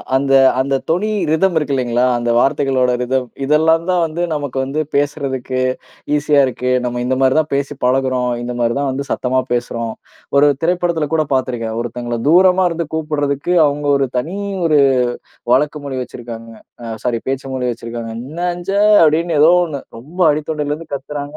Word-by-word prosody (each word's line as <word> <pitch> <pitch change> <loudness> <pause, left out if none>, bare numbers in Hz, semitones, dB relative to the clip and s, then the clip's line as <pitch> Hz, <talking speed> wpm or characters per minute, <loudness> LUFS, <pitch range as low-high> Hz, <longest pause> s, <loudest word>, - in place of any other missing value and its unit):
அந்த 135 0 +1 0.3
அந்த 135 +1 +1
தொனி 190 +6 +1 0.2
ரிதம் 175 +2 +2
இருக்கு 145 -2 -1
இல்லைங்களா, 125 -1 +1
அந்த 120 0 -2
வார்த்தைகளோட 130 -1 +2
ரிதம். 125 0 -1 0.2
இதெல்லாம் 160 +3 +3
தான் 180 -1 +2
வந்து, 160 +2 -4
நமக்கு 145 -3 -4
வந்து 140 +3 -3 0.2
பேசுறதுக்கு 135 -3 -1 0.6
ஈசியா 150 0 +2
இருக்கு. 125 0 -2
நம்ம 120 0 -2
இந்த 130 +1 0
மாதிரிதான் 150 +4 +2
பேசி 140 +1 -2
பழகுறோம், 130 -1 +1
இந்த 120 0 -4
மாதிரிதான் 120 +4 0
வந்து 140 +1 -4
சத்தமா 130 0 0
பேசுறோம். 115 -2 -2 0.4
ஒரு 145 - +6 0.2
திரைப்படத்துல 170 -3 0
கூட 155 -1 +2
பார்த்திருக்கேன், 120 -4 -2
ஒருத்தங்கள 120 0 -4
தூரமா 185 +2 +5
இருந்து 165 -2 -3
கூப்பிடுறதுக்கு, 150 0 -1
அவங்க 145 +1 -3
ஒரு 135 -1 0
தனி 165 +10 -3 0.3
ஒரு 155 -3 +4 0.7
வழக்கு 150 +3 +2
மொழி 135 -2 -4
வச்சிருக்காங்க, 115 -2 -9 0.3
அ - - -8 0.2
சாரி 120 -2 0
பேச்சு 135 0 -3
மொழி 125 -1 -2
வச்சிருக்காங்க. 115 0 -6
"என்னஞ்ஞே" 175 +7 -2 0.2
அப்டின்னு 160 0 +2
ஏதோ 155 +3 +7
ஒண்ணு 150 -5 -5 0.2
ரொம்ப 160 +10 -10
அடித்தொண்டைலருந்து 150 +1 -3
கத்துறாங்க. 145 +1 -6
140 Hz, 150 wpm, -17 LUFS, 125-155 Hz, 0.7 s, ஏதோ